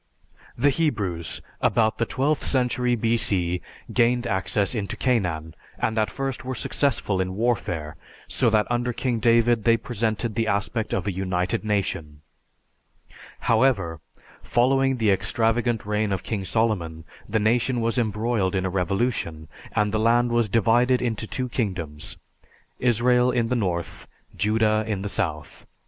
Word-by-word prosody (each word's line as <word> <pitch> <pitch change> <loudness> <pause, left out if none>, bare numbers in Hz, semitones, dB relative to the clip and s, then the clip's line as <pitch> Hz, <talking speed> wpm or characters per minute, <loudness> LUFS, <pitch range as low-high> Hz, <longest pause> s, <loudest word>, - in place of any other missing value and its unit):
The 140 +4 +4
Hebrews, 105 - -1 0.2
about 110 0 +2
the 115 - +1
twelfth 140 +3 0
century 125 -1 +1
B.C., 100 -6 0 0.3
gained 120 0 +2
access 100 0 0
into 105 -4 -3
Canaan, 90 -11 0 0.2
and 110 - -1
at 110 - +1
first 135 -2 -4
were 130 0 -4
successful 110 -5 0
in 95 0 -3
warfare, 90 -9 -1 0.3
so 120 - +2
that 110 -1 +3
under 120 0 0
King 120 -1 -1
David 115 0 +3
they 115 0 +4
presented 110 0 -2
the 115 0 0
aspect 105 +2 -1
of 95 - -1
a 100 - 0
united 90 0 -1
nation. 85 -8 -2 1.2
However, 115 - +2 0.4
following 135 +2 +2
the 110 -3 +3
extravagant 115 +3 +1
reign 105 0 0
of 95 -1 -2
King 100 -4 -3
Solomon, 90 -8 -1 0.3
the 110 - +1
nation 120 +3 +1
was 115 +2 +1
embroiled 110 -3 0
in 95 0 0
a 95 - -1
revolution, 90 -4 -1 0.2
and 105 0 +1
the 110 - 0
land 120 +2 +3
was 120 -2 +2
divided 120 +4 +3
into 110 -2 -2
two 130 +3 -3
kingdoms 90 - -4 0.6
Israel 125 +1 +3
in 115 -2 0
the 125 - +1
north, 90 -7 -2 0.3
Judah 110 0 +2
in 100 -3 -2
the 105 - -3
south. 75 -5 -4
110 Hz, 145 wpm, -24 LUFS, 95-120 Hz, 1.2 s, The